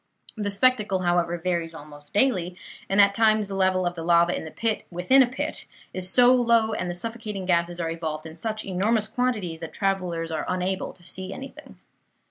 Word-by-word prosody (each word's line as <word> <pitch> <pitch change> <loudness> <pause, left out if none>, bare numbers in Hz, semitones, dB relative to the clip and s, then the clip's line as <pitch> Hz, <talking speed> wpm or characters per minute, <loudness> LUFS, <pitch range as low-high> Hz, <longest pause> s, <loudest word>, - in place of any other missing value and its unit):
The 210 -2 -2
spectacle, 210 -2 +2
however, 175 -1 +1
varies 170 -1 -2
almost 145 -1 -13
daily; 185 -6 +1 0.3
and 195 - +2
at 200 0 +6
times 215 -1 +3
the 195 - -6
level 190 -1 +2
of 175 - 0
the 170 - -7
lava 170 +1 +4
in - - -5
the - - -6
pit 225 +5 -2
within 180 +10 +4
a 255 - +5
pit 250 - -4 0.3
is 185 0 -2
so 245 +5 +6
low, 230 -3 +3
and 180 -4 -2
the 175 - -3
suffocating 215 -1 -5
gases 175 -1 +1
are 165 -1 -2
evolved 160 -2 -4
in 160 0 -9
such 215 +4 -4
enormous 205 +4 +1
quantities, 215 -8 -2
that 165 -1 -8
travellers 180 -4 -1
are 155 -2 -2
unable 185 +1 -2
to 175 -2 -22
see 185 +2 -6
anything. 270 +6 -10
185 Hz, 195 wpm, -25 LUFS, 170-215 Hz, 0.3 s, at